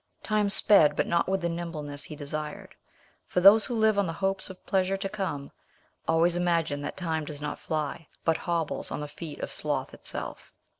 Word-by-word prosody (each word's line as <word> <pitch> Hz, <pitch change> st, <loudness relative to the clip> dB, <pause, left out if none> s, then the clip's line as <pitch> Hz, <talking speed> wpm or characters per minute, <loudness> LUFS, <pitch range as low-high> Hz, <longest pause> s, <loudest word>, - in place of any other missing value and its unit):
Time 210 Hz, -1 st, +1 dB
sped, 175 Hz, -7 st, +7 dB
but -, -, +1 dB
not 170 Hz, +1 st, +1 dB
with 190 Hz, 0 st, 0 dB
the 170 Hz, -, 0 dB
nimbleness 155 Hz, -4 st, -5 dB
he 155 Hz, -, -8 dB
desired; 150 Hz, +1 st, -6 dB, 0.5 s
for -, -, 0 dB
those 200 Hz, +4 st, +8 dB
who 245 Hz, -, -3 dB
live 220 Hz, -2 st, +3 dB
on 200 Hz, -, +2 dB
the 165 Hz, -, -3 dB
hopes 195 Hz, +3 st, -2 dB
of 190 Hz, -, -12 dB
pleasure 190 Hz, 0 st, +1 dB
to 195 Hz, 0 st, -3 dB
come, 185 Hz, -9 st, -4 dB, 0.6 s
always 165 Hz, +2 st, +3 dB
imagine 170 Hz, -5 st, 0 dB
that 145 Hz, -, -5 dB
time 160 Hz, -4 st, -1 dB
does 150 Hz, -1 st, -7 dB
not 150 Hz, 0 st, -4 dB
fly, 155 Hz, 0 st, -3 dB, 0.2 s
but 165 Hz, -, +3 dB
hobbles 170 Hz, -3 st, -2 dB
on -, -, -4 dB
the 150 Hz, -, -4 dB
feet 150 Hz, +1 st, -8 dB
of -, -, -4 dB
sloth -, -, -2 dB
itself. -, -, -7 dB
170 Hz, 195 wpm, -28 LUFS, 150-195 Hz, 0.6 s, those